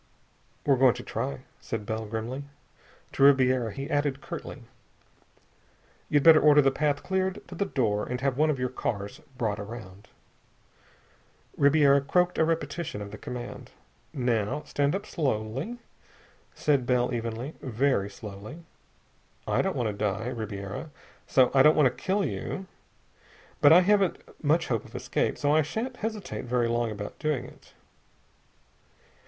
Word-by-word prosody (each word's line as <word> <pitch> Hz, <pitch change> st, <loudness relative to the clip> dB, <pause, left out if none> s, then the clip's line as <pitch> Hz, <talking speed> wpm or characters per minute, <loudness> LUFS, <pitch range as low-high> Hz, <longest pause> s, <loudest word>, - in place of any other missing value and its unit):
"We're 140 Hz, -2 st, +4 dB
going 130 Hz, -3 st, +5 dB
to -, -, -7 dB
try," 70 Hz, -1 st, -4 dB, 0.2 s
said 110 Hz, -2 st, -5 dB
Bell 110 Hz, +1 st, -3 dB
grimly. 115 Hz, +6 st, -4 dB, 0.7 s
To -, -, -4 dB
Ribiera 130 Hz, -4 st, +5 dB
he 135 Hz, +6 st, -5 dB
added 145 Hz, -3 st, 0 dB
curtly, -, -, -8 dB, 1.5 s
"You'd 145 Hz, -1 st, +3 dB
better 160 Hz, -2 st, +8 dB
order 150 Hz, -1 st, +6 dB
the 135 Hz, -, +4 dB
path 145 Hz, +1 st, 0 dB
cleared 190 Hz, 0 st, -2 dB
to -, -, -8 dB
the 200 Hz, +3 st, -1 dB
door, 110 Hz, -, 0 dB
and 125 Hz, 0 st, -3 dB
have 135 Hz, -1 st, 0 dB
one 155 Hz, +3 st, +3 dB
of 150 Hz, -, +1 dB
your 125 Hz, 0 st, -1 dB
cars 100 Hz, -5 st, -4 dB, 0.2 s
brought 110 Hz, -4 st, -1 dB
around." 100 Hz, -2 st, -9 dB, 1.5 s
Ribiera 140 Hz, -1 st, +5 dB
croaked 180 Hz, +6 st, +1 dB
a -, -, +5 dB
repetition 165 Hz, -5 st, -2 dB
of 100 Hz, -1 st, -7 dB
the -, -, -8 dB
command. 125 Hz, -1 st, -7 dB, 0.4 s
"Now 120 Hz, 0 st, -1 dB
stand 145 Hz, +3 st, 0 dB
up 200 Hz, -, -4 dB
slowly," 135 Hz, -, -2 dB, 0.8 s
said 140 Hz, -5 st, +1 dB
Bell 125 Hz, 0 st, +2 dB
evenly. 115 Hz, +4 st, -4 dB
"Very 125 Hz, -4 st, 0 dB
slowly. 105 Hz, +10 st, -9 dB, 0.8 s
I -, -, +1 dB
don't -, -, -1 dB
want 120 Hz, -, -1 dB
to -, -, -3 dB
die, 105 Hz, +3 st, -2 dB
Ribiera, 105 Hz, +3 st, -5 dB, 0.4 s
so 130 Hz, -2 st, +4 dB
I 135 Hz, -, +6 dB
don't 150 Hz, +3 st, +6 dB
want 150 Hz, -, +5 dB
to 125 Hz, -, 0 dB
kill 200 Hz, +1 st, +1 dB
you. 190 Hz, -, -4 dB, 1.0 s
But 145 Hz, -, +7 dB
I 175 Hz, +3 st, +9 dB
haven't 195 Hz, -1 st, +3 dB, 0.3 s
much 160 Hz, +3 st, +3 dB
hope 115 Hz, -4 st, 0 dB
of -, -, -15 dB
escape, -, -, -1 dB
so 145 Hz, 0 st, +1 dB
I 155 Hz, -, +5 dB
shan't 230 Hz, -, -4 dB
hesitate 215 Hz, -, -4 dB
very 120 Hz, -1 st, +1 dB
long 120 Hz, 0 st, 0 dB
about 105 Hz, -1 st, -7 dB
doing 150 Hz, -5 st, -1 dB
it. -, -, -16 dB
130 Hz, 150 wpm, -27 LUFS, 110-155 Hz, 1.5 s, I